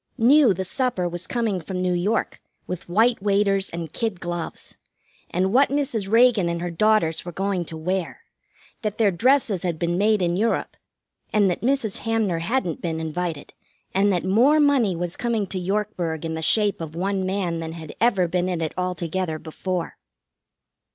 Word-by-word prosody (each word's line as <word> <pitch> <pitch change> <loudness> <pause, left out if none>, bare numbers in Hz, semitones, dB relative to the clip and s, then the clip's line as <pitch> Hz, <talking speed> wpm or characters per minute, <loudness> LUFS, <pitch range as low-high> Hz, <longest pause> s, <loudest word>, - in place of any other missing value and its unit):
Knew 260 +1 +6
the 190 0 -2
supper 230 -4 -1
was 175 +1 -6
coming 225 -6 -1
from 185 +3 -5
New 180 0 +1
York, 195 +6 -1 0.2
with 180 -1 -6
white 225 +5 +3
waiters 200 -1 +2
and 165 -2 -6
kid 220 -6 -2
gloves. 175 -1 -5 0.5
And 190 +3 0
what 275 +3 +5
Mrs. 270 -8 -1
Reagan 225 -6 +5
and 170 0 -2
her 175 0 -3
daughters 170 -3 +2
were 175 - -6
going 190 0 -1
to 160 - -7
wear. 180 +2 -3 0.6
That 215 -2 -3
their 215 -3 +3
dresses 225 -1 +2
had 175 -3 -2
been 175 +2 -1
made 210 -1 +3
in 175 0 +1
Europe, 225 +5 0 0.6
and 205 -3 +3
that - - -4
Mrs. 245 -4 0
Hamner 220 -7 0
hadn't 175 - -1
been 165 -2 -2
invited, 160 -1 -4 0.4
and 200 +2 +3
that 180 -2 0
more 245 +11 +4
money 270 -10 +3
was 175 0 -4
coming 235 -4 -1
to 185 0 -4
Yorkburg 180 -4 -2
in 160 - -3
the 160 - -4
shape 205 +2 +2
of 160 -1 -6
one 190 +2 -1
man 185 -3 -1
than 160 0 -5
had 160 -2 -9
ever 195 -7 +3
been 180 +1 0
in 180 -2 -2
it 160 -2 -2
altogether 180 -2 -2
before. 170 +2 -4
185 Hz, 180 wpm, -23 LUFS, 170-220 Hz, 0.6 s, Knew